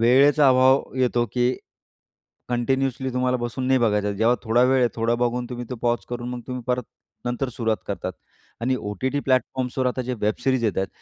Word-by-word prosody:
वेळेचा 135 Hz, +4 st, +5 dB
अभाव 130 Hz, +1 st, +5 dB
येतो, 120 Hz, -2 st, +2 dB
की 125 Hz, +1 st, +2 dB, 0.9 s
कंटिन्यूअसली 130 Hz, +2 st, 0 dB
तुम्हाला 125 Hz, 0 st, +1 dB
बसून 120 Hz, +2 st, -3 dB
नाही 130 Hz, 0 st, +4 dB
बघायचा. 105 Hz, -2 st, +1 dB
जेव्हा 115 Hz, +4 st, +3 dB
थोडा 115 Hz, +2 st, +3 dB
वेळ 130 Hz, +1 st, +4 dB
आहे. 120 Hz, -, +4 dB
थोडा 115 Hz, +1 st, +1 dB
बघून 120 Hz, 0 st, -1 dB
तुम्ही 125 Hz, 0 st, -5 dB
तो 125 Hz, -, -3 dB
पॉज 120 Hz, 0 st, +1 dB
करून 120 Hz, 0 st, -4 dB
मग 125 Hz, -1 st, -5 dB
तुम्ही 125 Hz, -1 st, -5 dB
परत 125 Hz, -1 st, 0 dB, 0.4 s
नंतर 125 Hz, +2 st, -2 dB
सुरुवात 115 Hz, -2 st, -1 dB
करतात. -, -, -3 dB, 0.5 s
आणि 130 Hz, +2 st, +1 dB
ओ-टी-टी 130 Hz, +8 st, -2 dB
प्लॅटफॉर्म्सवर 130 Hz, 0 st, 0 dB
आता 125 Hz, +1 st, -1 dB
जे 125 Hz, +1 st, -3 dB
वेब 105 Hz, 0 st, +1 dB
सिरीज 130 Hz, -3 st, +2 dB
येत 105 Hz, -, 0 dB
आहेत, 95 Hz, -, 0 dB
125 Hz, 185 wpm, -23 LUFS, 120-130 Hz, 0.9 s, वेळेचा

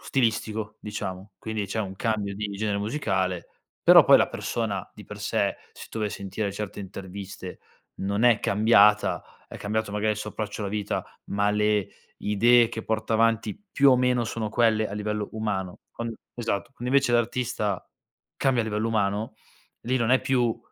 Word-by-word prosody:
stilistico, 110 Hz, -4 st, -1 dB
diciamo, 100 Hz, -1 st, -6 dB
quindi 110 Hz, -2 st, -3 dB
c'è 100 Hz, +3 st, -4 dB
un 95 Hz, -3 st, -4 dB
cambio 105 Hz, -1 st, -1 dB
di 105 Hz, +1 st, -3 dB
genere 105 Hz, -1 st, -1 dB
musicale, 95 Hz, -, -1 dB, 0.3 s
però -, -, +9 dB
poi -, -, +7 dB
la -, -, +3 dB
persona 105 Hz, -5 st, -3 dB
di -, -, -12 dB
per -, -, -9 dB
sé, -, -, 0 dB, 0.2 s
se -, -, -11 dB
tu -, -, -5 dB
vai 105 Hz, -1 st, 0 dB
a -, -, -10 dB
sentire 100 Hz, +1 st, -3 dB
certe 105 Hz, 0 st, -5 dB
interviste, 95 Hz, -1 st, -8 dB, 0.4 s
non 100 Hz, +2 st, -1 dB
è 120 Hz, -3 st, +5 dB
cambiata, 105 Hz, 0 st, +4 dB, 0.2 s
è -, -, -10 dB
cambiato 110 Hz, 0 st, -2 dB
magari 105 Hz, +1 st, +1 dB
il -, -, -5 dB
suo 105 Hz, 0 st, -5 dB
approccio 105 Hz, 0 st, -4 dB
alla 100 Hz, -, -3 dB
vita, 105 Hz, -1 st, -2 dB, 0.2 s
ma 100 Hz, +1 st, +1 dB
le 105 Hz, -1 st, +2 dB, 0.4 s
idee 115 Hz, +3 st, +5 dB
che 110 Hz, -, -5 dB
porta 110 Hz, 0 st, -2 dB
avanti 115 Hz, -, +1 dB
più 140 Hz, 0 st, +5 dB
o 130 Hz, -, +6 dB
meno 125 Hz, -1 st, +2 dB
sono 110 Hz, -1 st, -3 dB
quelle 110 Hz, -1 st, +2 dB
a 100 Hz, -, -6 dB
livello 105 Hz, 0 st, -2 dB
umano. 100 Hz, -4 st, -3 dB, 0.2 s
Con 115 Hz, 0 st, -4 dB, 0.2 s
esatto, 115 Hz, -2 st, -2 dB
quando 125 Hz, -2 st, -7 dB
invece 135 Hz, -3 st, +4 dB
l'artista, 120 Hz, -4 st, 0 dB, 0.5 s
cambia 130 Hz, -3 st, +2 dB
a -, -, -4 dB
livello 110 Hz, +1 st, -1 dB
umano, 110 Hz, +1 st, 0 dB, 0.5 s
lì 130 Hz, +2 st, 0 dB
non 115 Hz, -1 st, +1 dB
è 130 Hz, -, +5 dB
più 120 Hz, -4 st, +1 dB
105 Hz, 175 wpm, -26 LUFS, 100-115 Hz, 0.5 s, però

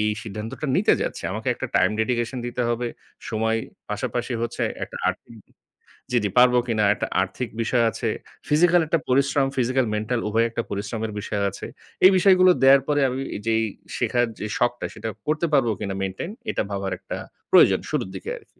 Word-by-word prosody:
এই 105 Hz, -, +2 dB
সিদ্ধান্তটা 110 Hz, +7 st, -6 dB
নিতে -, -, +4 dB
যাচ্ছি, -, -, -4 dB
আমাকে -, -, -3 dB
একটা -, -, -4 dB
টাইম -, -, +4 dB
ডেডিকেশন 120 Hz, +2 st, -1 dB
দিতে 120 Hz, +1 st, -2 dB
হবে, 120 Hz, 0 st, -1 dB, 0.4 s
সময় 110 Hz, 0 st, 0 dB, 0.3 s
পাশাপাশি 120 Hz, +3 st, -2 dB
হচ্ছে 120 Hz, -, -3 dB, 0.2 s
একটা -, -, -10 dB
আর্থিক 115 Hz, -, -5 dB, 0.8 s
জি, 125 Hz, -, +3 dB
জি, 105 Hz, -, +1 dB
পারব 125 Hz, 0 st, +7 dB
কিনা, 110 Hz, -3 st, +1 dB
একটা -, -, -3 dB
আর্থিক 100 Hz, +5 st, -3 dB
বিষয় 120 Hz, +1 st, +2 dB
আছে। 115 Hz, -, -2 dB, 0.4 s
ফিজিক্যাল 175 Hz, +3 st, +5 dB
একটা 165 Hz, +1 st, +2 dB
পরিশ্রম, 140 Hz, +1 st, +3 dB
ফিজিক্যাল-মেন্টাল 120 Hz, -2 st, 0 dB
উভয়ই 115 Hz, +2 st, +2 dB
একটা 115 Hz, 0 st, -3 dB
পরিশ্রমের 110 Hz, +2 st, -3 dB
বিষয় 105 Hz, 0 st, -3 dB
আছে। 100 Hz, -, -8 dB, 0.4 s
এই 190 Hz, -, +9 dB
বিষয়গুলো 185 Hz, 0 st, +6 dB
দেয়ার 135 Hz, +1 st, +7 dB
পরে 145 Hz, -1 st, +2 dB
আমি 130 Hz, +2 st, -3 dB, 0.3 s
যেই 110 Hz, 0 st, +2 dB, 0.3 s
শেখার 120 Hz, -1 st, +1 dB
যে -, -, -4 dB
শখটা, 120 Hz, 0 st, 0 dB
সেটা 115 Hz, -, -5 dB, 0.2 s
করতে 155 Hz, +2 st, +1 dB
পারব 135 Hz, -4 st, +4 dB
কিনা 100 Hz, -1 st, -3 dB
মেইনটেইন, 95 Hz, -, -4 dB, 0.2 s
এটা -, -, -1 dB
ভাবার 100 Hz, -1 st, -3 dB
একটা -, -, -6 dB, 0.3 s
প্রয়োজন -, -, +6 dB
শুরুর -, -, -1 dB
দিকে 95 Hz, -, -6 dB
আরকি। -, -, -28 dB
120 Hz, 170 wpm, -24 LUFS, 110-135 Hz, 0.8 s, এই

